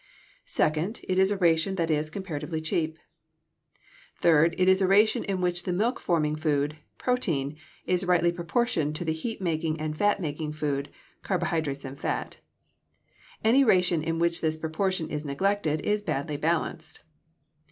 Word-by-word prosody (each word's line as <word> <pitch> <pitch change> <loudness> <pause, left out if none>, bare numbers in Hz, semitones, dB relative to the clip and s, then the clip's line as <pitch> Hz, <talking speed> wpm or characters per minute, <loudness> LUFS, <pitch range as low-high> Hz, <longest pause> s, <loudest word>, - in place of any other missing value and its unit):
Second, 160 +8 0
it 185 0 +1
is 190 0 +5
a 205 - 0
ration 170 +1 +2
that 165 -3 0
is 150 0 0
comparatively 160 -3 -4
cheap. 160 0 -1 1.2
Third, 165 0 +4
it 185 - +2
is 190 +1 +5
a 190 - +3
ration 210 +3 +4
in 195 -2 -2
which 175 -1 +1
the 180 - -3
milk 220 +8 0
forming 155 -3 +1
food 150 -1 0 0.2
(protein) 160 - -1 0.3
is 180 0 +1
rightly 175 -1 +3
proportioned 170 - -1
to 175 - -3
the 160 - 0
heat 195 +6 -5
making 160 -2 -1
and 155 0 -3
fat 205 +5 +2
making 150 -2 -4
food 145 -2 -2 0.3
(carbohydrates 160 -7 -1
and 135 +1 -8
fat). - - -3 1.1
Any 245 +5 +5
ration 180 -7 +3
in 165 +1 -2
which 170 0 +2
this 160 -1 0
proportion 160 +2 -1
is 150 -2 -4
neglected 155 +1 0
is 210 +4 0
badly 150 -4 -2
balanced. 160 +1 -2
165 Hz, 155 wpm, -27 LUFS, 155-190 Hz, 1.2 s, is